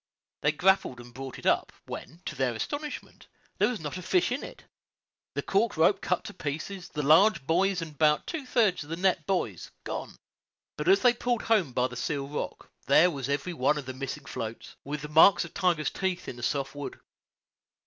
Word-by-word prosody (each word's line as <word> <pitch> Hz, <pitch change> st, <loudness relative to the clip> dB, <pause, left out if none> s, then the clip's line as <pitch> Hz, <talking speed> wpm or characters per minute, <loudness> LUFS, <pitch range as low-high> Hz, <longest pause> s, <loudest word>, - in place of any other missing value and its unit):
They 150 Hz, -, +3 dB
grappled 170 Hz, -5 st, +2 dB
and 120 Hz, 0 st, -12 dB
brought 135 Hz, 0 st, -7 dB
it -, -, -12 dB
up, -, -, +2 dB
when, 170 Hz, +3 st, -8 dB
to -, -, -3 dB
their 130 Hz, -4 st, 0 dB
astonishment, 290 Hz, -, -5 dB, 0.3 s
there -, -, +5 dB
was 245 Hz, -4 st, -2 dB
not 155 Hz, +3 st, -5 dB
a -, -, -7 dB
fish 180 Hz, +4 st, +2 dB
in 255 Hz, -, -1 dB
it, -, -, -10 dB, 0.7 s
the -, -, -1 dB
cork 205 Hz, -1 st, +1 dB
rope 180 Hz, +5 st, +4 dB
cut 180 Hz, -, 0 dB
to 210 Hz, -2 st, -8 dB
pieces, 170 Hz, +5 st, -5 dB
the 150 Hz, -, -3 dB
two -, -, -2 dB
large 165 Hz, -1 st, +5 dB
buoys 180 Hz, +3 st, +2 dB
and 160 Hz, -2 st, -8 dB
about 150 Hz, 0 st, +3 dB
two 310 Hz, -6 st, -5 dB
thirds 215 Hz, -10 st, +2 dB
of 145 Hz, -, -15 dB
the 165 Hz, -, -2 dB
net 180 Hz, -3 st, +1 dB
buoys 190 Hz, -2 st, -1 dB
gone. -, -, -5 dB, 0.6 s
But -, -, -4 dB
as 390 Hz, +1 st, +6 dB
they 245 Hz, -1 st, +6 dB
pulled 240 Hz, -1 st, -1 dB
home 205 Hz, -, +2 dB
by 125 Hz, 0 st, +1 dB
the 125 Hz, -, -10 dB
Seal 140 Hz, +2 st, -2 dB
Rock 150 Hz, -, -5 dB, 0.2 s
there 180 Hz, +2 st, +6 dB
was 140 Hz, -3 st, -4 dB
every 145 Hz, +5 st, -1 dB
one 145 Hz, 0 st, +2 dB
of 145 Hz, -, -5 dB
the 130 Hz, -, -5 dB
missing 135 Hz, +2 st, -6 dB
floats, 115 Hz, -3 st, -6 dB
with 145 Hz, +1 st, -5 dB
the -, -, -4 dB
marks 160 Hz, +5 st, +6 dB
of 170 Hz, -, -12 dB
Tiger's 170 Hz, -6 st, +1 dB
teeth 190 Hz, -2 st, -2 dB
in -, -, -5 dB
the 120 Hz, -, -10 dB
soft 135 Hz, +3 st, -1 dB
wood. 145 Hz, -1 st, -7 dB
160 Hz, 210 wpm, -28 LUFS, 140-195 Hz, 0.7 s, as